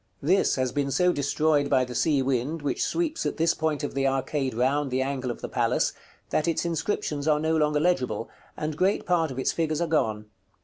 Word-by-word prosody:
This 185 +7 +3
has 130 -2 0
been 140 +1 -1
so 180 +6 +2
destroyed 145 +1 +1
by 130 -2 +3
the 125 - -8
sea 140 +2 +2
wind, 135 +4 -1
which 145 - -1
sweeps 330 -1 -1
at - - -3
this 165 +1 +3
point 155 -2 -1
of 145 - -3
the 135 0 +1
arcade 135 -1 -1
round 135 +4 +1
the 130 +1 0
angle 135 -2 -3
of 120 - -5
the - - -4
palace, - - +1 0.4
that 155 - +1
its 165 +1 0
inscriptions 160 -3 -2
are 150 -1 +3
no 160 +1 +1
longer 150 -1 +2
legible, 130 -10 0 0.3
and 155 0 -3
great 190 +6 +1
part 170 -3 +2
of 130 - -7
its 130 - +1
figures 155 -2 -1
are 170 - +1
gone. 110 -10 0
145 Hz, 215 wpm, -26 LUFS, 135-160 Hz, 0.4 s, This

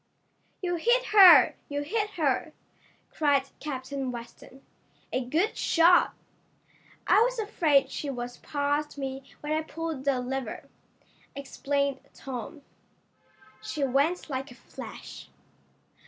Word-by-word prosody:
"You 355 -1 -1
hit 485 +8 +2
her! 360 -10 +9 0.2
You 290 0 -2
hit 420 +7 -1
her!" 310 -1 0 0.6
cried 285 -3 +2 0.2
Captain 270 -2 -4
Weston. 240 +2 -11 0.5
"A 255 - 0
good 325 - 0
shot!" 345 +1 +4 0.9
"I 420 - +5
was - - +1
afraid 310 -11 +2
she 290 - -4
was 245 -2 -5
past 290 +1 -2
me 270 -1 -4 0.2
when 295 - -5
I 310 - +1
pulled 320 -3 -5
the 275 -2 +2
lever," 250 -2 -5 0.7
explained 280 0 -2 0.2
Tom. 270 +3 -7 1.0
"She 300 - -4
went 280 +7 +1
like 270 -2 -4
a 245 - -13
flash." - - -10
285 Hz, 115 wpm, -27 LUFS, 265-330 Hz, 1.0 s, her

